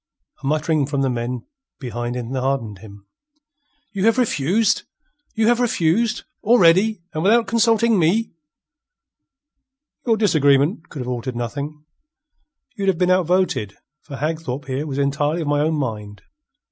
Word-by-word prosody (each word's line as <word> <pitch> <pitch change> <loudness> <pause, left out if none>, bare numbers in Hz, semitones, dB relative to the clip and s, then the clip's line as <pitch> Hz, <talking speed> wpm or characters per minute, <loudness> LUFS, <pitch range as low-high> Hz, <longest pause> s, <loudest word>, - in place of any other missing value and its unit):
A - - -4
muttering 155 -1 +1
from 140 -1 -1
the 135 - +1
men 120 +1 -4 0.3
behind 120 -1 -4
enheartened 125 -3 -2
him. 100 -1 -14 0.9
"You 200 -2 -1
have 225 +2 +4
refuse'? 215 - +1 0.5
You 220 -1 +2
have 240 +1 +3
refuse' 220 -1 +1 0.2
already 200 -2 +4
and 155 - -2
without 225 +6 +4
consulting 230 0 +3
me?" 195 +8 +1 1.8
"Your 225 -2 +3
disagreement 155 -4 +2
could 145 - -7
have 125 - -5
altered 125 0 -4
nothing. 145 +6 -5 0.9
You'd 200 -3 -3
have 190 -3 +2
been 180 +1 +2
outvoted, 180 - +1 0.2
for 140 - -9
Hagthorpe 145 -2 -3
here 135 +3 -3
was 135 -2 -4
entirely 145 +4 0
of 155 - -4
my 145 0 +1
own 155 +1 +1
mind. 105 -7 -5
155 Hz, 135 wpm, -21 LUFS, 130-195 Hz, 1.8 s, have